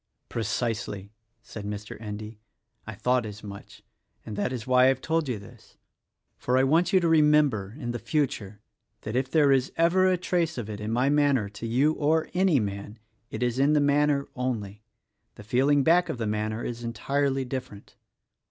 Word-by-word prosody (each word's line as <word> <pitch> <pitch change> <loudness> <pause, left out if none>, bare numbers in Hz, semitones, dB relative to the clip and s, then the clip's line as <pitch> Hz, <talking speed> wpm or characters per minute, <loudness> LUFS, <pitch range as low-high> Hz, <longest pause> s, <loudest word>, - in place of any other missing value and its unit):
"Precisely!" 110 -3 -3 0.3
said 110 -3 -9
Mr. 105 0 -6
Endy, 105 0 -7 0.5
"I - - -6
thought 125 0 +1
as 105 -1 -8
much, 100 -1 -11 0.4
and 105 - -6
that 105 +5 -1
is 120 -3 -5
why 130 0 +5
I - - +6
have 135 -1 +2
told 160 0 -1
you 120 - -1
this; 100 -1 -16 0.6
for 125 +1 +1
I 130 - +4
want 165 +8 +3
you 190 - +5
to - - 0
remem 150 -2 +5
ber, 105 0 -6
in 120 -5 -4
the 120 - -4
future, 110 -10 -2 0.4
that 110 - -5
if 130 +1 0
there 145 -1 +4
is 135 -1 +2
ever 180 +3 +4
a 185 -1 +3
trace 170 -3 -1
of 110 -3 -5
it 105 - -6
in 105 0 -4
my 125 +4 +2
manner 140 -8 +2
to 105 +3 -7
you 135 +7 +2
or 155 +1 +1
any 180 -5 +3
man, 100 +1 -5 0.3
it - - -4
is 120 +1 0
in 140 +2 +4
the 150 - +4
manner 145 0 +2
only: 105 -5 -3 0.3
— - - -50
the - - -11
feeling 135 +6 +2
back 175 +3 +4
of - - -3
the 115 - -2
manner 110 +2 -2
is 120 0 -5
entirely 135 +4 -1
different." 125 -5 -7
125 Hz, 195 wpm, -26 LUFS, 110-145 Hz, 0.6 s, I